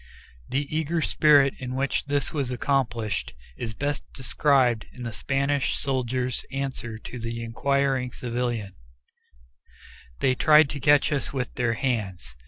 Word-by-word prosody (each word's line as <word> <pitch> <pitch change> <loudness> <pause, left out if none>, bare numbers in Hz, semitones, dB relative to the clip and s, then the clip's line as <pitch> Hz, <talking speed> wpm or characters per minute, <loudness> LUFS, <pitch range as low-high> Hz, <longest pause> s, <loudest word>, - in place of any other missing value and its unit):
The 140 +2 -2
eager 160 +2 0
spirit 145 -3 +5
in 130 0 -5
which 135 +1 0
this 145 -1 -1
was 140 -5 -1
accomplished 120 - -1 0.2
is 110 -2 -5
best 145 +3 -2
described 130 -4 +2
in 125 - -9
the 115 -1 -4
Spanish 140 +7 0
soldier's 130 -2 -1
answer 130 -4 -4
to 125 +2 -8
the 115 0 -4
inquiring 135 +2 0
civilian, 120 -5 -3 1.5
"They 130 - +3
tried 150 +2 +5
to 145 - -5
catch 145 +2 +4
us 145 -2 -1
with 125 -2 -3
their 125 -2 0
hands." 100 - -2
130 Hz, 135 wpm, -26 LUFS, 115-140 Hz, 1.5 s, spirit